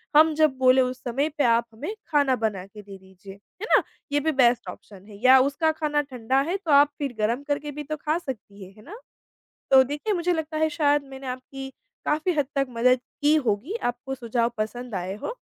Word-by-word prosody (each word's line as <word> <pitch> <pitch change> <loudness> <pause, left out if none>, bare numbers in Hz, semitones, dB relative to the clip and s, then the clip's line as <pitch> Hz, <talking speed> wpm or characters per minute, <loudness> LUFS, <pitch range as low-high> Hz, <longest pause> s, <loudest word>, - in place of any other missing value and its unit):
हम 315 +1 +6
जब 305 -4 +2
बोले 260 0 +5
उस 255 0 -1
समय 270 +5 -1
पे 290 - +2
आप 235 0 +3
हमें 295 - -5
खाना 285 -4 +2
बनाके 200 -1 -3
दे 200 -1 -11
दीजिए, 190 +1 -14 0.3
है - - -2
ना? - - +4 0.3
ये 290 - +2
भी 315 +2 0
बेस्ट 250 -4 +3
ऑप्शन 195 -2 -12
है। 205 -2 -12
या 260 +1 +8
उसका 285 +4 +1
खाना 305 -2 0
ठंडा 260 -2 -1
है 385 - 0
तो 350 -6 -4
आप 285 +1 +6
फिर 280 -4 -3
गर्म 230 +6 0
करके 290 0 -2
भी 295 +1 -6
तो 310 +2 -4
खा 305 +2 +1
सकती 220 - -8
हैं, 190 +1 -13
है 215 - -15
ना। 420 - -11 0.7
तो 265 -1 +8
देखिए 290 - -3
मुझे 355 -1 0
लगता 315 -1 -3
है 315 0 +2
शायद 290 -1 +3
मैंने 270 0 -9
आपकी 265 +1 -7 0.4
काफ़ी 310 +4 +1
हद 295 -3 +1
तक 275 -1 +1
मदद 250 +2 +3 0.2
की 295 +1 +4
होगी। 255 - -1
आपको 245 +2 -3
सुझाव 235 -1 -1
पसंद 230 +2 -4
आए 185 +1 -3
हो। - - -4
270 Hz, 215 wpm, -25 LUFS, 235-300 Hz, 0.7 s, या